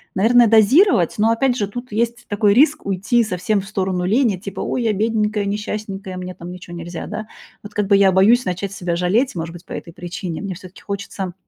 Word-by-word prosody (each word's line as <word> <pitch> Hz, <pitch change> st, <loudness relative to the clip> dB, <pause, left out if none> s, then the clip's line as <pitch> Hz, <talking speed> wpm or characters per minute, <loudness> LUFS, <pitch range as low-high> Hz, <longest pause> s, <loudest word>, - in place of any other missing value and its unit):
Наверное, 230 Hz, +4 st, +5 dB
дозировать, 225 Hz, -, +4 dB
но, 220 Hz, +2 st, +3 dB
опять 245 Hz, +2 st, +1 dB
же, 205 Hz, -5 st, -1 dB
тут 245 Hz, +4 st, -8 dB
есть 235 Hz, +3 st, -2 dB
такой 205 Hz, 0 st, +2 dB
риск 290 Hz, +6 st, +3 dB
уйти 200 Hz, +5 st, +1 dB
совсем 200 Hz, +1 st, -1 dB
в -, -, -11 dB
сторону 190 Hz, -3 st, -2 dB
лени, 215 Hz, 0 st, +2 dB
типа: 195 Hz, +1 st, -8 dB
"Ой, 250 Hz, -, -2 dB
я 225 Hz, -, +2 dB
бедненькая, 210 Hz, 0 st, 0 dB
несчастненькая, 200 Hz, -2 st, -4 dB
мне 185 Hz, 0 st, -6 dB
там 175 Hz, 0 st, -9 dB
ничего 180 Hz, -1 st, -9 dB
нельзя, 170 Hz, 0 st, -6 dB
да". 215 Hz, 0 st, -6 dB, 0.4 s
Вот, 205 Hz, 0 st, -10 dB
как 205 Hz, -2 st, -1 dB
бы, 200 Hz, -, +5 dB
я 195 Hz, -1 st, +5 dB
боюсь 215 Hz, +7 st, +4 dB
начать 185 Hz, +2 st, -3 dB
себя 175 Hz, -3 st, -2 dB
жалеть, 195 Hz, +8 st, +1 dB
может 165 Hz, 0 st, -4 dB
быть, 175 Hz, +1 st, -12 dB
по -, -, -17 dB
этой 170 Hz, -, -7 dB
причине. 175 Hz, -1 st, -6 dB
Мне 195 Hz, -2 st, -4 dB
всё-таки 185 Hz, 0 st, -13 dB
хочется 200 Hz, -2 st, -5 dB
200 Hz, 210 wpm, -20 LUFS, 185-220 Hz, 0.4 s, Наверное